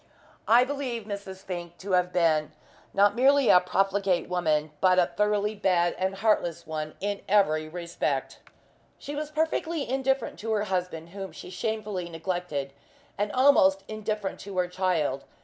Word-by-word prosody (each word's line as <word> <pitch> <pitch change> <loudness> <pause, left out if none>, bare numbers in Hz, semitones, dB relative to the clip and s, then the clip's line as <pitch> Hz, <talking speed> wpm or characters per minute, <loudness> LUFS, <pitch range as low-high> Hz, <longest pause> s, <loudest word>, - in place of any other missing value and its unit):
I 235 +2 +6
believe 260 -4 -3
Mrs. 200 -2 -7
Fink 175 -2 -6
to 195 +1 -7
have 180 -1 +2
been 160 -4 +2 0.4
not 205 +1 +4
merely 270 +1 +4
a 180 - +8
profligate 195 0 +1
woman, 155 -4 0
but 185 -1 +4
a 180 - +5
thoroughly 210 +1 +1
bad 180 -4 +2
and 190 +1 0
heartless 190 -5 0
one 155 -1 -5
in 205 0 -2
every 155 -7 +3
respect. 165 -5 -3 0.6
She 290 - -7
was 300 0 -3
perfectly 320 0 -1
indifferent 265 -1 -1
to 220 +1 -2
her 210 -1 +1
husband, 180 -4 -3
whom 195 +1 -7
she - - -10
shamefully 210 -2 -3
neglected, 165 -5 -3 0.4
and 205 +1 -1
almost 195 -8 +5
indifferent 215 -2 -3
to 195 -1 -8
her 180 -1 +2
child. 175 -7 0
190 Hz, 150 wpm, -27 LUFS, 175-215 Hz, 0.6 s, a